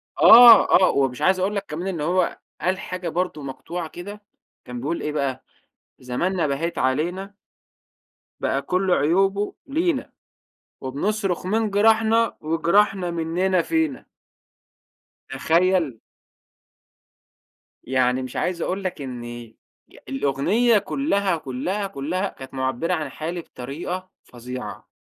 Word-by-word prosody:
آه، 235 0 +9
آه، 185 - +5
و 140 -1 +3
مش 125 -1 -9
عايز 190 0 +3
أقول 195 +3 0
لَك 200 - -2
كمان 165 +5 -5
إن 175 -5 -3
هو 175 +5 0 0.2
قال 185 +2 0
حاجة 180 -2 -5
برضه 175 -2 -2
مقطوعة 160 +5 -6
كده، 205 +5 -9 0.4
كان 125 0 -7
بيقول 160 +5 -2
إيه 150 - -2
بقى 140 -3 -2 0.6
زماننا 165 +8 -1
بهيت 155 +3 -2
علينا. 175 +10 -1 1.0
بقى 135 - 0
كل 185 +6 0
عيوبه 195 +7 +2
لينا، 330 +5 -1 0.7
وبنصرخ 185 +7 -2
من 215 +2 0
جراحنا، 225 +2 +3
وجراحنا 175 +4 +1
مننا 170 +2 0
فينا. 320 -4 -1 1.2
تخيل. 170 -7 +1 1.8
يعني 130 0 +1
مش 130 -1 -7
عايز 175 -2 -2
أقول 190 +3 -2
لك 185 -5 -4
إن 120 -3 -7 0.6
الأغنية 140 - +2
كلّها، 200 - 0
كلّها، 175 +10 -3
كلّها 185 +4 -3
كانت 130 0 -12
مُعبّرة 130 +6 -1
عن 155 -5 -2
حالي 170 +5 -5
بطريقة 170 +8 -6
فظيعة 125 -3 -8
175 Hz, 115 wpm, -23 LUFS, 140-195 Hz, 1.8 s, آه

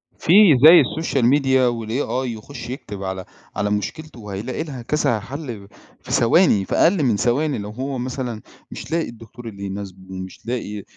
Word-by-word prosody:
في 165 - +1 0.3
زي 170 +3 +10
الsocial 150 -6 -1
media 130 -1 +3
والAI 120 +2 -2
يخُش 120 0 -9
يكتب 105 -6 -7
على 95 -1 -4 0.3
على 105 0 -1
مشكلته 125 +8 -4
وهيلاقي 105 +7 -5
لها 140 -6 -7
كذا 120 -3 0
حَل 120 -3 -7 0.3
في - - -10
ثواني، 115 - +4
في - - -2
أقل 170 -2 +3
من 120 -5 +2
ثواني 140 +7 +1
لو 105 0 -6
هو 130 +5 -4
مثلًا 125 -3 -4 0.3
مش - - -8
لاقي 165 0 0
الدكتور 115 +1 -12
اللي 100 -3 -8
يناسبه 95 -1 -7
ومش 95 +1 -8
لاقي 110 -4 -4
120 Hz, 165 wpm, -21 LUFS, 105-135 Hz, 0.3 s, زي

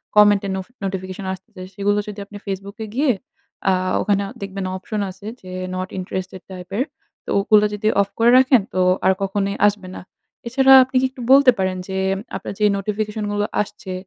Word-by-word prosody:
কমেন্টে 205 -1 +5
Nof 190 -1 -4 0.2
notification 190 +1 -5
আসতেছে। 185 0 -12
সেগুলো 205 +1 +1
যদি 210 0 -7
আপনি 205 +1 -10
Facebook 195 +1 -5
এ - - -10
গিয়ে 280 +1 +3 0.6
আ - - +5 0.3
ওখানে 200 -1 +1 0.2
দেখবেন 195 -1 -4
অপশন 210 +3 -4
আছে 195 +2 -12 0.2
যে, 185 - -10 0.2
নট 185 0 -3
ইন্টারেস্টেড 185 0 -5
টাইপ 180 -1 -9
এর। 255 - +2 0.4
তো - - -10
ওগুলো 210 +1 +4
যদি 210 +1 -2
অফ 200 - 0
করে 235 +1 +5
রাখেন 255 -2 +5
তো 185 - -1 0.3
আর 190 - +6
কখনোই 195 0 -1
আসবে 205 -2 -2
না। - - -7 0.5
এছাড়া 270 +2 +5
আপনি 260 +1 -10
কি - - +2
একটু 260 -1 -11
বলতে 270 -1 +8
পারেন 185 -1 0
যে, 190 -1 -4 0.4
আপনার 190 - -5
যে 210 - +3
নোটিফিকেশন 210 +1 -3
গুলো 205 0 0 0.2
আসছে 195 -2 -6
200 Hz, 185 wpm, -21 LUFS, 190-215 Hz, 0.6 s, বলতে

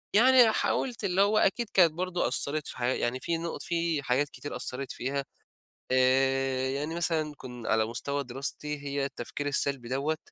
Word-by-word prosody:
يعني 245 0 +7
حاولت، 235 +1 -1
اللي 190 0 +2
هو 205 +2 +4
أكيد 225 +2 +2
كانت 175 -4 +6
برضه 180 +1 -1
أثرت 150 +1 -1
في - - -5
حيا 125 +1 +1
يعني 120 +2 -1
في 165 +5 -1
نُقط 165 0 -4
في 165 -4 -1
حاجات 135 +3 +1
كتير 145 - -7
أثرت 130 +1 -3
فيها، 140 +2 -3 0.7
آآ، 130 0 +2
يعني 150 +5 -3
مثلًا 160 -3 0
كُن 125 -3 -8
على 110 0 +3
مستوى 140 +5 -3
دراستي، 140 +3 -4
هي 140 -1 -2
التفكير 140 +2 -5
السلبي 140 -3 -1
دَوَّة، 140 +4 0
140 Hz, 170 wpm, -29 LUFS, 130-170 Hz, 0.7 s, يعني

